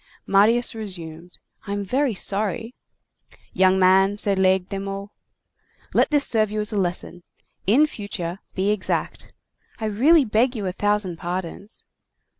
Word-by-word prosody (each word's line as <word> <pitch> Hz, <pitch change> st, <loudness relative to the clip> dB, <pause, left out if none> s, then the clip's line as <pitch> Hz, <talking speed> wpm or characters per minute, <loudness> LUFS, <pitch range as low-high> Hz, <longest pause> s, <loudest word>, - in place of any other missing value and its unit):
'" -, -, -30 dB
Marius 220 Hz, +5 st, +3 dB
resumed:— 175 Hz, -5 st, -8 dB, 0.3 s
"I 200 Hz, -, -3 dB
am 205 Hz, 0 st, -2 dB
very 255 Hz, +3 st, 0 dB
sorry—" 215 Hz, +5 st, -1 dB, 0.8 s
"Young 185 Hz, 0 st, +3 dB
man," 190 Hz, +2 st, +4 dB
said 200 Hz, -2 st, 0 dB
Laigle 190 Hz, -1 st, +2 dB
de 195 Hz, -1 st, -4 dB
Meaux, 195 Hz, +1 st, -6 dB, 0.8 s
"let -, -, +3 dB
this 290 Hz, -2 st, +3 dB
serve 215 Hz, -2 st, +2 dB
you 215 Hz, +1 st, -3 dB
as 210 Hz, +1 st, +1 dB
a -, -, -1 dB
lesson. 180 Hz, -1 st, -3 dB, 0.5 s
In 260 Hz, +10 st, +5 dB
future, 195 Hz, -, -6 dB, 0.2 s
be 195 Hz, +2 st, +1 dB
exact." 210 Hz, -3 st, -2 dB, 0.5 s
"I 220 Hz, -, -4 dB
really 270 Hz, +9 st, +4 dB
beg 240 Hz, +4 st, +1 dB
you 210 Hz, -3 st, -4 dB
a 185 Hz, -, -1 dB
thousand 205 Hz, -2 st, -1 dB
pardons." 180 Hz, +4 st, -6 dB
200 Hz, 150 wpm, -23 LUFS, 185-220 Hz, 0.8 s, In